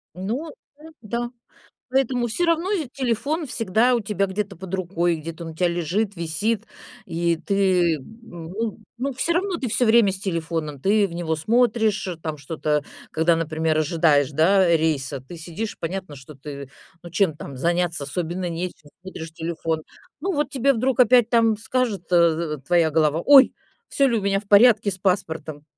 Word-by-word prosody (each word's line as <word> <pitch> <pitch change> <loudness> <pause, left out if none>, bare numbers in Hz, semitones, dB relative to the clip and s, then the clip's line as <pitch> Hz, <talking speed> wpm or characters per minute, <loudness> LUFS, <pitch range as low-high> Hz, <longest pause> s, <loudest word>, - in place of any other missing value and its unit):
Ну, 235 - -4 0.3
ну 320 +1 -13
да. 235 +3 -3 0.6
Поэтому 255 -2 +1
всё 240 +10 -1
равно 335 +3 +1
ведь 315 -11 -2
телефон 280 +5 -1
всегда 230 +2 +2
у 235 - +1
тебя 200 -2 -1
где-то 195 0 -4
под 190 +1 -7
рукой, 175 -2 0
где-то 165 +1 -7
он 165 - -6
у - - -15
тя 175 +2 +1
лежит, 180 +5 -1
висит, 195 +7 -2 0.4
и 170 -1 0
ты, 180 -3 +1
ну 210 - -7 0.2
ну 275 +2 -2
всё 325 +7 0
равно 365 +1 0
ты 260 -6 -3
всё 245 +1 +2
время 220 -3 +5
с 190 - -6
телефоном, 165 -6 -3
ты 205 +1 +3
в 170 - -10
него 170 -2 -1
смотришь 220 +3 +1 0.2
там 155 -2 -3
что-то, 150 0 -2 0.3
когда, 165 +1 +2
например, 160 -1 0
ожидаешь, 155 -3 +2
да, 180 +5 +4
рейса, 150 -5 0
ты 170 +4 -9
сидишь, 175 +7 -6
понятно, 185 -1 -4
что 140 +2 -12
ты, 140 0 -8 0.3
ну, 175 - -9
чем 175 -2 +1
там 140 -3 -9
заняться? 170 +1 0
Особенно 175 +4 -3
нечем, 170 -3 -6
смотришь 165 -3 -8
телефон. 160 -1 -3 0.4
Ну 380 +4 -1
вот 290 -1 -1
тебе 275 0 +2
вдруг 255 +2 0
опять 245 -1 +5
там 225 -2 +3
скажет, 225 -3 -1
э, - - +6 0.4
в - - -14
в - - -20
твоя 170 -2 +3
голова: 155 +1 +2
"Ой! 280 -1 +7 0.3
Всё 275 - +2
ли 230 -2 +1
у - - -4
меня 195 0 +1
в 205 - -20
порядке 215 0 +6
с 185 - -7
паспортом?" 165 -6 -2
185 Hz, 175 wpm, -23 LUFS, 160-230 Hz, 0.6 s, Ой